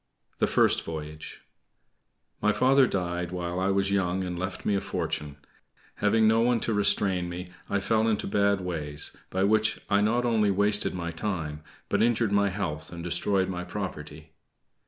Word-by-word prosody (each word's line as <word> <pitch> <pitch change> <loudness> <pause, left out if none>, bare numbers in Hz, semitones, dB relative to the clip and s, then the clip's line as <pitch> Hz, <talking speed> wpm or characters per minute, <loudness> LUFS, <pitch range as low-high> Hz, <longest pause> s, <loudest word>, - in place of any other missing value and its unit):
THE - - +3
FIRST - - +3
VOYAGE 75 -1 -7 1.0
My 105 - +3
father 135 +2 +4
died 90 -3 -2
while 90 0 -3
I 95 - +1
was 100 0 +1
young 95 -1 0
and 90 -1 -4
left 95 0 -5
me 105 - +2
a 100 - +1
fortune. 75 -1 -4 0.6
Having 110 +1 +3
no 110 +1 +4
one 120 0 +3
to 115 - -1
restrain 95 -3 +2
me, 90 +1 -6 0.2
I 100 - +1
fell 110 +3 +1
into 110 -2 0
bad 100 -1 +2
ways, 75 -5 -3
by 95 +1 0
which 110 +2 +2
I 100 0 +4
not 120 +4 +1
only 110 -3 +2
wasted 100 0 +2
my 85 -2 -3
time, 80 -4 -4 0.3
but - - +1
injured 115 -2 +2
my 100 0 +3
health, 90 -6 -4
and 85 -1 -7
destroyed 95 +2 +1
my 90 -1 -4
property. 80 -6 -7
95 Hz, 170 wpm, -27 LUFS, 85-105 Hz, 1.0 s, father